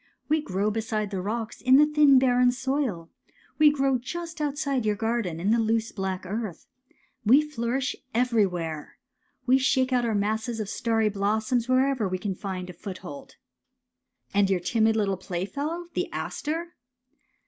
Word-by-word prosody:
<< - - -46
We 310 +1 +3
grow 200 -4 -1
beside 215 -1 -2
the 190 -2 -2
rocks 220 +3 -4
in 280 +4 +5
thin 295 -3 +6
barren 250 -1 +4
soil. 255 - -2 0.5
We 305 -1 +8
grow 270 -3 +1
just 330 +5 -6
outside 280 -3 -1
your 210 -1 +1
garden 225 -6 -2
in 195 +5 +1
the 230 - +3
loose 225 0 0
black 190 -2 -4
earth. 205 -2 -5 0.6
We 255 +8 +6
flourish 265 -2 -2 0.2
everywhere. 195 -11 0 0.5
We 260 +1 +4
shake 260 0 +2
out 250 -1 +2
our 230 -2 0
masses 220 +3 -1
of 210 -2 -3
starry 225 -1 +1
blossoms 215 +4 0
wherever 255 -3 +2
we 185 - -1
can 195 +1 -3
find 185 -1 -5
a - - -13
foothold. 240 +10 -9 0.5
'' 250 0 -41
And 200 -1 +3
your 190 -2 +2
timid 220 +5 +2
little 200 -3 0
playfellow, 245 - -4
the - - -2
aster? 330 +3 -4
230 Hz, 160 wpm, -26 LUFS, 200-265 Hz, 0.6 s, We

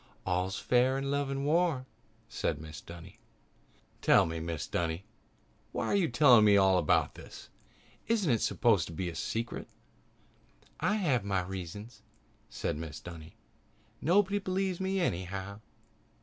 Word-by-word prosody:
"All's 95 +1 -1
fair 125 +2 +2
in 140 0 -2
love 140 -1 0
and 135 0 -2
war," 155 -4 +2 0.4
said 80 - -2
Mrs. 75 +1 -10
Dunny. 85 0 -11 0.8
"Tell - - +5
me, 80 0 -4
Mrs. 80 -2 -5
Dunny. 85 +1 -1 0.7
Why - - -2
are - - +1
you 190 -5 +2
telling 125 -3 +6
me 105 -1 +6
about 95 -4 +3 0.2
all - - -28
this? - - -12 0.6
Isn't 210 - +2
it 115 - +2
supposed 105 -9 +2
to 85 - -8
be 90 +2 -3
a 85 - -8
secret?" 115 +1 -3 1.1
"I 185 +6 +1
have 145 - +1
my 95 -2 0
reasons," 95 +5 -7 0.5
said - - -3
Mrs. 80 -1 -7
Dunny. 85 -2 -10 0.7
"Nobody 200 +5 +3
believes 190 -1 -1
me 190 0 -1
anyhow." 95 - -3
105 Hz, 145 wpm, -31 LUFS, -, 1.1 s, telling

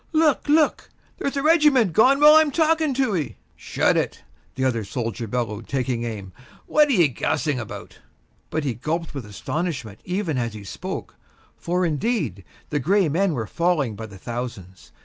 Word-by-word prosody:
Look! 310 -3 +2
look! 305 0 +3 0.3
there's 280 0 -2
a 275 - -1
regiment 300 - +4
gone 265 - +5
while 300 +1 +9
I'm 315 -1 +6
talking 315 -1 +2
to 260 -5 +1
ye." 140 -10 -3 0.2
"Shut - - +1
it!" - - -2 0.3
the 130 - -1
other 115 -4 0
soldier 115 +2 -4
bellowed, 115 -1 -3
taking 125 -3 -1
aim, 100 -5 -6 0.3
"what 300 0 +4
are - - 0
ye 175 -8 +5
gassing 140 +2 -1
about?" 115 - -8 0.5
But 155 - -2
he 135 -4 -1
gulped 160 +9 -3
with 135 -7 -6
astonishment 120 - -4
even 180 -6 -2
as 115 -2 -3
he 105 - -8
spoke, 95 - -6 0.4
for, 180 +1 -1
indeed, 155 - -1 0.3
the 145 - +1
gray 185 +5 +2
men 180 +4 +1
were 115 -3 -2
falling 150 - 0
by 110 +2 -7
the 100 -2 -12
thousands. 115 -4 -7
150 Hz, 170 wpm, -23 LUFS, -, 0.5 s, while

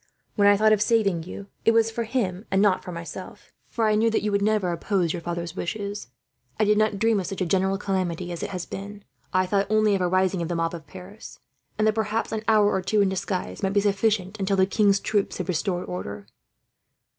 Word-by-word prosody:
When 205 -2 +4
I 205 0 +6
thought 215 +1 +5
of 210 - +1
saving 210 -6 +2
you, 195 +2 -8 0.2
it 225 - +4
was 225 0 +3
for 230 +1 -3
him 210 -5 -2
and 190 - +2
not 200 -2 +3
for 180 - -7
myself; 170 -1 -9 0.2
for 230 - 0
I 215 - +3
knew 220 +2 +3
that 225 - 0
you 210 - 0
would 200 0 +1
never 205 -3 +1
oppose 170 0 0
your 175 - -4
father's 170 0 -4
wishes. 200 - -4 0.5
I - - +4
did 210 0 +3
not 215 -2 +2
dream 225 0 +2
of 185 - -4
such 195 - -5
a 185 - 0
general 190 +2 +1
calamity 185 -3 -2
as 170 - -5
it - - -3
has 180 -2 -4
been. 200 +1 -8 0.3
I 185 0 +2
thought 195 +1 +1
only 215 -1 +3
of 195 - 0
a 180 - +2
rising 185 0 +1
of 170 - -2
the 175 - -2
mob 165 0 -1
of 165 -3 -8
Paris, 190 +3 -11 0.4
and 215 - +2
that 215 - +3
perhaps 220 +1 -1
an 220 -1 -2
hour 210 -2 +4
or 190 - 0
two 210 +3 +1
in 195 - +3
disguise 190 0 -3
might 195 -1 0
be 200 - +3
sufficient, 205 0 0
until 195 0 0
the 190 - +5
king's 200 0 +3
troops 205 -2 -1
restored 180 0 -2
order." 100 +3 -6
195 Hz, 235 wpm, -25 LUFS, 180-215 Hz, 0.5 s, I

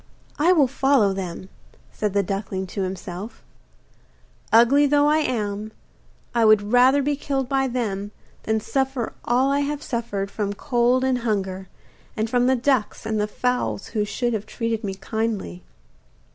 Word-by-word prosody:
'I 340 +5 +5
will 295 -6 +4
follow 265 -6 +2
them,' 185 -1 -5 0.4
said 210 -2 -2
the 200 0 +2
duckling 195 0 -3
to 190 +2 -5
himself; 185 +2 -6 1.1
'ugly 250 +6 +6
though 290 +1 +3
I 305 +1 +4
am, 215 -6 -2 0.6
I 235 -1 +2
would 215 0 +4
rather 260 +3 +5
be 290 +1 +1
killed 275 -2 -2
by 270 0 +1
them 210 -5 -3 0.3
than 220 0 0
suffer 265 -1 -2
all 255 +3 +2
I 280 - +2
have 290 +1 -2
suffered 205 -6 -3
from 205 -2 -2
cold 245 +4 +1
and 260 -1 +1
hunger, 195 -5 -2 0.5
and 220 +1 0
from 245 -1 +3
the 260 - +4
ducks 255 -3 0
and 215 -1 -1
fowls 210 - -2
who 215 -2 -1
should 240 +4 -2
have 215 -1 -3
treated 230 -1 -3
me 195 -2 -3
kindly. 205 - -3
230 Hz, 155 wpm, -23 LUFS, 205-265 Hz, 1.1 s, ugly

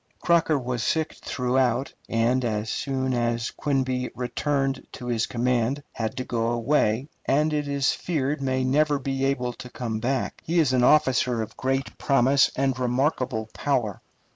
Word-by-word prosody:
Crocker 170 -3 +3
was 125 -2 -3
sick 160 +6 0
throughout, 125 0 0 0.2
and, 120 +3 +2
as 110 -1 -1
soon 130 -1 -1
as 120 -1 0
Quinby 130 -3 -1
returned 135 +2 -1
to 125 - -8
his 115 -2 0
command, 125 +3 0
had 115 +2 -3
to 130 - -1
go 115 -2 -1
away, 120 0 +1 0.2
and 150 +3 +2
it 150 -1 -1
is 140 -1 +1
feared 145 -4 -2
may 130 -1 0
never 145 +3 +2
be 135 0 -2
able 125 -3 0
to 125 +1 -10
come 115 -3 -4
back. 130 +2 -2
He 170 +2 -1
is 150 -6 +3
an 125 -1 +3
officer 125 -4 +3
of 110 - -10
great 135 +1 -2
promise 135 0 +4
and 135 -1 0
remarkable 125 -3 0
power. 120 - -1
130 Hz, 160 wpm, -25 LUFS, 120-140 Hz, 0.2 s, promise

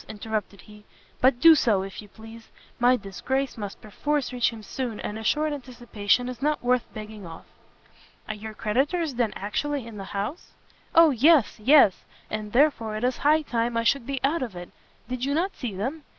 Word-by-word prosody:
interrupted 210 -2 -4
he; 210 0 -16 0.4
"but 255 -1 +4
do 330 +4 +9
so, 220 -10 +2
if 195 +1 -8
you 210 - -13
please; 225 +2 -13 0.3
my 245 +1 +4
disgrace 260 +7 -3
must 205 -3 -7
perforce 280 +6 -2
reach 245 -1 +2
him 225 -2 -10
soon, 240 0 -4
and 210 +1 -5
a - - -7
short 305 +6 +1
anticipation 245 -4 -1
is 250 -2 -7
not 300 -1 0
worth 250 -1 +1
begging 215 -1 -8
off." 165 -2 -10 0.8
"Are - - -3
your 215 +1 -8
creditors 285 +10 0
then 235 -3 0
actually 275 +6 -3
in 230 -2 -9
the 195 - -6
house?" 210 - -5 0.4
"O 330 -2 +7
yes, 275 -1 +4
yes! 255 -4 +5 0.3
and 215 -1 -4
therefore 235 -5 +2
it 215 - -4
is 250 0 +1
high 305 +2 +3
time 235 -3 -1
I 230 - +1
should 250 +1 +1
be 275 -1 -2
out 290 +4 +1
of 235 -7 -4
it! 175 0 -9 0.4
Did 250 0 -4
you 280 +2 0
not 370 +5 -1
see 235 -7 -5
them? 260 +11 -3
240 Hz, 195 wpm, -25 LUFS, 215-275 Hz, 0.8 s, do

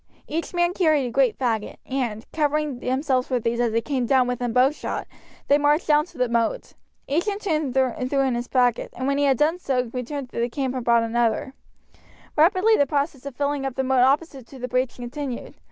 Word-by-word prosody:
Each 330 +2 -3
man 345 0 +1
carried 310 -7 +2
a 245 - -4
great 260 -2 +2
faggot, 225 -5 -1
and, 240 -5 -3
covering 300 -3 0
themselves 260 0 0
with 250 -3 0
these 235 +1 0
as 240 -2 +2
they 230 +1 +1
came 255 -1 -2 0.2
within 245 -1 -2
bowshot, 260 +5 +1 0.4
they 285 +1 +4
marched 295 +3 +2
down 300 0 +3
to 340 -3 -18
the 250 0 +1
moat. 235 - -1 0.3
Each 330 +8 0
in 405 -1 0
turn 315 -9 -1
threw 260 +1 0
in 265 -2 +1
his 240 +1 -3
faggot, 245 -3 +1
and 260 - -4
when 280 +1 +1
he 285 - +3
had 270 -2 +3
done 320 +6 +2
so 250 -7 -1
returned 255 +1 -4
to - - -3
the 235 +1 0
camp 260 +1 -2
and 255 -2 -3
brought 235 0 +4
back 230 - -2
another. 240 +3 0 0.8
Rapidly 370 +7 +4
the 285 - +2
process 280 -1 -2
of 275 - -7
filling 285 0 -1
up 270 -2 -3
the 265 - 0
moat 260 -1 +2
opposite 270 -1 +1
to 270 - -12
the 250 0 -4
breach 255 0 -1
continued. 250 +1 -6
265 Hz, 215 wpm, -24 LUFS, 245-295 Hz, 0.8 s, they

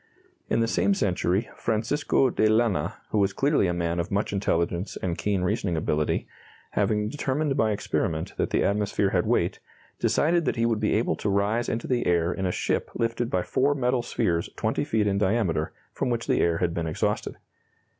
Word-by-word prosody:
In - - +2
the 115 - +2
same 200 - +2
century 95 - 0
Francisco 125 +4 +1
de 110 - +2
Lana, 110 -2 +1 0.2
who 105 - +2
was 100 -1 +2
clearly 140 -8 +2
a - - +1
man 85 0 -1
of 85 - -2
much 100 0 -1
intelligence 90 -1 -1
and 85 -2 -2
keen 100 -1 -1
reasoning 90 -3 0
ability, 75 -1 0 0.4
having 105 -1 +1
determined 140 +3 -1
by 110 - +2
experiment 80 -5 -2
that - - 0
the - - +1
atmosphere 100 -1 +1
had 90 -2 +1
weight, - - +1 0.4
decided 170 +2 +2
that - - 0
he 115 -1 +1
would 115 -2 +1
be - - +1
able - - +1
to 105 - -2
rise 100 +4 +1
into 115 - -2
the 125 -2 0
air 85 0 +2
in 95 -1 -2
a - - 0
ship - - -1
lifted 115 +1 -1
by 90 -1 0
four 140 +2 +1
metal 125 -2 +1
spheres 85 -7 -1
20 - - -1
feet 110 -2 +1
in 100 -1 +1
diameter 95 -6 +1 0.2
from - - -1
which 120 -1 -1
the - - +2
air 85 -1 +2
had 85 -1 0
been 85 -1 -2
exhausted. 80 - -2
105 Hz, 195 wpm, -26 LUFS, 90-120 Hz, 0.4 s, In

